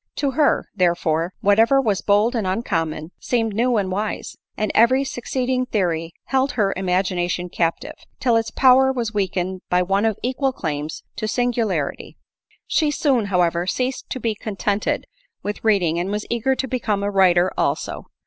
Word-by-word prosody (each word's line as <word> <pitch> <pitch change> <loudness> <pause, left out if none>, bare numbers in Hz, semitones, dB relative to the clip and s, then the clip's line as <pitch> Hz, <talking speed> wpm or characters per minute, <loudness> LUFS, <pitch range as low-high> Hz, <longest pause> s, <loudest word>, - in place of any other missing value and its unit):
To 280 -2 0
her, 290 +2 +2
therefore, 170 -1 +1
whatever 225 +7 +4
was 215 -7 0
bold 210 +4 +2
and 215 -5 -1
uncommon, 165 -6 -2
seemed 225 -3 0
new 240 +2 +2
and 190 -2 -1
wise; 205 +3 -3 0.2
and 215 -1 -1
every 255 +4 +4
succeeding 255 0 -2
theoiy 170 -7 -1
held 270 +1 0
her 200 -4 +1
imagination 180 -1 -1
captive, 165 -1 -1 0.3
till 240 -3 +2
its 225 0 +1
power 265 0 +5
was 235 -4 -3
weakened 185 -2 -2
by 180 0 +3
one 195 +3 +1
of 220 -3 +1
equal 260 +2 0
claims 155 - -4
to 215 - -2
singularity. 220 - -1 0.5
She 310 -3 +1
soon, 270 -6 +1
however, 175 -2 +1
ceased 255 +6 -2
to 260 - -4
be 230 -2 -1
contented 205 0 -2 0.4
with 205 0 -4
read 210 -4 +3
ing, 165 0 0
and 180 +2 -2
was 210 +1 -3
eager 235 +3 +1
to 265 - -2
become 215 -6 -1
a 205 - -1
writer 185 -2 +4
also. - - -2
210 Hz, 165 wpm, -21 LUFS, 180-245 Hz, 0.5 s, power